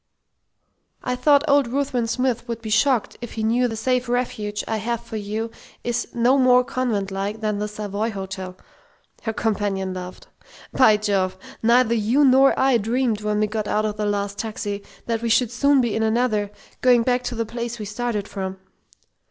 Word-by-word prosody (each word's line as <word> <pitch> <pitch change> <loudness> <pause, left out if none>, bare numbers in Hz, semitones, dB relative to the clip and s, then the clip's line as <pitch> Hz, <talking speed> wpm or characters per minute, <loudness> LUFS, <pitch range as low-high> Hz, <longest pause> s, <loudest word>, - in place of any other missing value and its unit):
"I 250 - -1
thought 285 +3 +4
old 280 -3 +4
Ruthven 255 -2 -1
Smith 245 0 -1
would 235 -1 -4
be 220 -2 -6
shocked 245 +1 +2
if 240 - -7
he 220 - -3
knew 240 +3 +2
the 225 - -4
'safe 250 +2 0
refuge' 215 -4 -2
I 220 - -1
have 235 +2 -3
for 235 -1 -8
you 215 +2 -3 0.3
is 240 0 -1
no 245 +4 +3
more 250 -1 +5
convent 225 -7 -2
like 200 +3 -3
than 210 -2 -1
the 210 - -1
Savoy 210 +1 -3
Hotel," 190 -2 -6 0.6
her 225 - -2
companion 200 -4 -1
laughed. 180 0 -8 0.5
"By 220 -5 +5
Jove, 195 -3 0 0.2
neither 235 +1 +4
you 235 +6 +3
nor 270 +1 +5
I 265 -3 +4
dreamed 225 0 0
when 210 0 0
we - - +4
got 215 0 -3
out 215 +1 +1
of 210 -1 -3
the 210 -1 -1
last 200 0 -2
taxi 205 -2 -4 0.2
that 230 -1 -1
we 235 - -1
should 235 0 +3
soon 280 +3 +3
be 235 -3 -1
in 220 - 0
another, 220 -2 +1 0.3
going 245 -2 +5
back 250 +1 +1
to 245 - -3
the 230 0 -1
place 235 +1 -5
we 215 - -6
started 210 -1 -3
from!" 190 -1 -5
225 Hz, 185 wpm, -23 LUFS, 210-245 Hz, 0.6 s, more